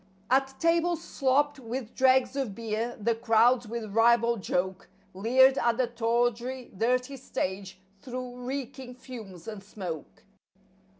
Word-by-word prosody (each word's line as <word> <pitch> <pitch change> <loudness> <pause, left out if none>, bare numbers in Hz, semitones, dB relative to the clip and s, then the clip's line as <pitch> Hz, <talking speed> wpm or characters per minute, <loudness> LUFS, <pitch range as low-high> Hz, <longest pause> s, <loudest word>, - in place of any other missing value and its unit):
At 270 0 +2
tables 335 0 +2
slopped 280 +2 +1
with 240 -1 -5
dregs 260 0 +3
of 260 -8 -2
beer 230 +2 -3
the 230 +3 +1
crowds 230 +1 +3
with 220 -2 -5
ribald 235 0 +4
joke 185 +1 -2 0.2
Leered 260 +7 +4
at 235 -1 +2
the 255 - +3
tawdry, 240 +2 -1
dirty 250 +6 0
stage 190 -6 -4 0.2
through 250 -1 -6
reeking 260 -1 -5
fumes 220 -9 -10
and 210 -3 -7
smoke. 180 -7 -7
240 Hz, 125 wpm, -28 LUFS, 220-260 Hz, 0.2 s, ribald